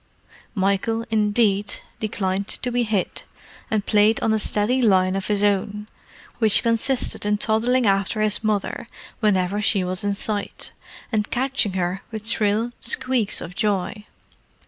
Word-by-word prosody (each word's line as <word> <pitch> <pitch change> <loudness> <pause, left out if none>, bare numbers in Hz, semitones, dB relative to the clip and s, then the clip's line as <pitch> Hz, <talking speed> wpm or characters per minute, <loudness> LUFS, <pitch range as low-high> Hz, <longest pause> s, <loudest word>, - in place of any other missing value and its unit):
Michael, 200 +4 0
indeed, 210 -1 +1 0.2
declined 200 -2 -2
to 250 - 0
be 245 0 0
hid, 215 -5 -2 0.5
and 215 -2 -1
played 215 +1 +3
on 220 - +1
a 220 - +1
steady 215 +5 +1
line 190 -4 +3
of 195 - -3
his 205 -1 0
own, 205 +1 0 0.5
which 220 -3 +6
consisted 230 +3 +1
in 210 0 +1
toddling 235 +4 +1
after 195 +2 +1
his 215 0 0
mother 215 +1 -2 0.3
whenever 200 -2 +1
she 200 -2 +2
was 180 +1 -3
in 200 0 0
sight, 205 0 0 0.4
and 215 -2 -1
catching 260 -5 0
her 185 0 -2
with 220 -1 -7
shrill 220 +1 +1
squeaks 240 -2 0
of 175 - -8
joy. 210 +1 -2
210 Hz, 145 wpm, -22 LUFS, 200-225 Hz, 0.5 s, which